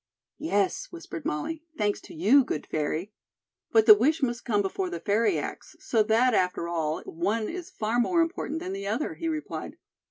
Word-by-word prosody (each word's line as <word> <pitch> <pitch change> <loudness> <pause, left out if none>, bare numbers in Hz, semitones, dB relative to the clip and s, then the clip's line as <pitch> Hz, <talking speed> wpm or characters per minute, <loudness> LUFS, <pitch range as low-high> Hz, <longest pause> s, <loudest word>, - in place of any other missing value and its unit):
"Yes," 205 - 0
whispered 330 - -8
Molly; 305 - -2 0.2
"thanks 205 -1 0
to - - -12
you, 220 - +5
good 155 - -4
fairy." 155 +6 -2 0.6
"But 220 -1 +5
the 220 - +11
wish 285 +9 +2
must 240 -2 -1
come 205 -3 +2
before 365 - -2
the 360 - -4
fairy 220 +3 +2
acts, - - -6
so 225 - +1
that, 230 +4 +3
after 180 -3 +1
all, 160 -2 -2
one 210 +7 -1
is 355 -1 -6
far 225 +2 -1
more 335 +9 +2
important 330 -1 -1
than 185 - -4
the 200 0 -5
other," 225 +9 -1
he 330 - -4
replied. 310 -1 -4
220 Hz, 185 wpm, -27 LUFS, 195-305 Hz, 0.6 s, the